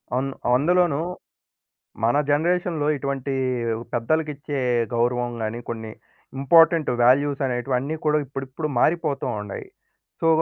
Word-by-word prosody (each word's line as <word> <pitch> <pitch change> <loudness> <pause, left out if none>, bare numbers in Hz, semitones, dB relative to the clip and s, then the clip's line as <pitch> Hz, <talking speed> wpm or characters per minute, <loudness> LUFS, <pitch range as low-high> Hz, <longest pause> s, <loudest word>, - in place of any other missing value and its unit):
అన్ 135 +2 0 0.3
అందులోనూ 170 +1 +2 1.0
మన 120 +5 +3
జనరేషన్‌లో 165 0 +1
ఇటువంటీ 140 0 -3 0.6
పెద్దలకిచ్చే 145 +3 -1 0.4
గౌరవం 120 +1 +1
గాని, 110 +2 -3
కొన్ని 110 -1 -5 0.5
ఇంపార్టెంట్ 165 +3 +5
వాల్యూస్ 140 +3 +3
అనేటివి 125 +1 -1
అన్నీ 145 +5 -3
కూడా 150 0 +3
ఇప్పుడిప్పుడు 135 +3 -5
మారిపోతూ 155 -4 +1 0.2
ఉండాయి. 105 -1 -7 0.5
సో 165 - +2
140 Hz, 105 wpm, -23 LUFS, 125-155 Hz, 1.0 s, ఇంపార్టెంట్